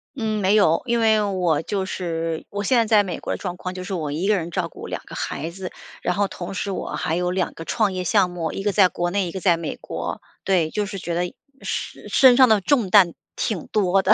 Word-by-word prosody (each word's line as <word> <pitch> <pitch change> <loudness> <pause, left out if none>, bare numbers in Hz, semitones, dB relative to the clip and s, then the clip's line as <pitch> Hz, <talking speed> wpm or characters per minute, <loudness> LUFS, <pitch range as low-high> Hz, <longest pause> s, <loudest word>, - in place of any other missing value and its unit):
嗯， 220 -4 -1
没 195 +3 +3
有， 165 -6 +4
因 235 -1 +1
为 220 -1 +4
我 180 -7 +1
就 195 +2 -2
是 165 -3 -3
我 205 0 -3
现 250 +4 +3
在 230 - +4
在 210 -1 +5
美 180 -4 -4
国 - - -3
的 - - -3
状 180 -2 -4
况， 185 0 -5
就 185 0 -6
是 190 - -5
我 155 -5 -2
1 170 +7 -1
个 210 - +4
人 170 -2 -3
照 - - -1
顾 - - -10
2 - - -4
个 - - -12
孩 155 +4 -3
子， 185 0 -7 0.3
然 180 - 0
后 200 0 +1
同 180 +1 -7
时 195 +1 -3
我 - - -4
还 165 -2 -1
有 180 0 0
2 180 -1 -1
个 165 - -9
创 210 -4 +1
业 185 0 -2
项 185 0 +3
目， 170 -3 -3
一 195 - -5
个 205 - +1
在 195 -2 +5
国 175 0 -2
内， 195 -2 0
一 - - -5
个 190 - -5
在 175 -3 +3
美 165 -2 -4
国。 - - -5 0.2
对， 180 -5 +2
就 210 -1 -1
是 200 -1 -6
觉 175 -2 -4
得 175 +1 -2 0.3
身 - - -5
身 260 -2 +6
上 260 -1 +8
的 210 -2 +4
重 235 -5 +2
担 180 -4 +6 0.2
挺 195 -8 -2
多 195 -2 +2
的， 200 +3 +5
190 Hz, 270 characters per minute, -23 LUFS, 175-205 Hz, 0.3 s, 上